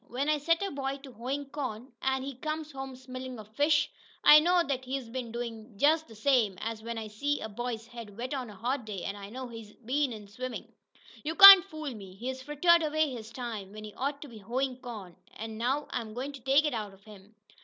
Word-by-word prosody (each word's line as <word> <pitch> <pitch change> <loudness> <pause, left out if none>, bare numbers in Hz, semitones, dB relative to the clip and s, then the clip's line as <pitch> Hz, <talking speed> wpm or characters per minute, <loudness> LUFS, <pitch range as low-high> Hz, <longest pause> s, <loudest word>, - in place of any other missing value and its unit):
When 270 +5 -2
I 305 -1 +2
set 330 +5 +2
a 395 - -2
boy 275 -1 -3
to 270 - -10
hoein' 255 +5 -4
corn, 255 -3 -5
an' 265 0 0
he 275 +1 -5
comes 310 +4 -4
home 270 -1 -7
smellin' 255 0 -8
of 215 0 -13
fish, 295 +1 +3 0.3
I 300 - +10
know 350 +4 +3
what 275 -7 +1
he's 260 -2 -4
been 240 -1 -5
doin' 230 -2 -6
jest 315 +4 +3
th' 225 - -13
same 225 -6 +2
as 225 0 -4
when 230 +1 -5
I 220 -1 -4
see 285 +8 -1
a - - -4
boy's 230 +1 -4
head 230 -4 -10
wet 250 +4 -4
on 255 -4 -3
a 210 - -11
hot 250 +6 -2
day 205 -4 -6
I 200 0 -6
know 255 +3 -6
he's 225 -3 -10
been 260 +3 -1
in 210 -3 -8
swimmin'! 250 +4 -7 0.5
You 315 +2 -2
can't 390 -1 +12
fool 310 -7 -6
me. 195 -4 -11
He's 260 +5 -5
frittered 295 +5 +4
away 310 -1 +1
his 225 -3 -7
time, 220 -6 -6
when 215 0 -9
he 210 -1 -9
ought 280 +5 -3
t' - - -9
be 230 -4 -11
hoein' 250 +5 -2
corn, 220 -9 -9 0.2
an' 220 0 -6
now 265 +5 0
I'm 220 -2 -4
goin' 265 +4 -4
to 275 -2 -11
take 275 +4 +4
it 300 - 0
out 210 -4 -4
of 195 - -25
him!" 210 0 -15
255 Hz, 230 wpm, -30 LUFS, 220-285 Hz, 0.5 s, can't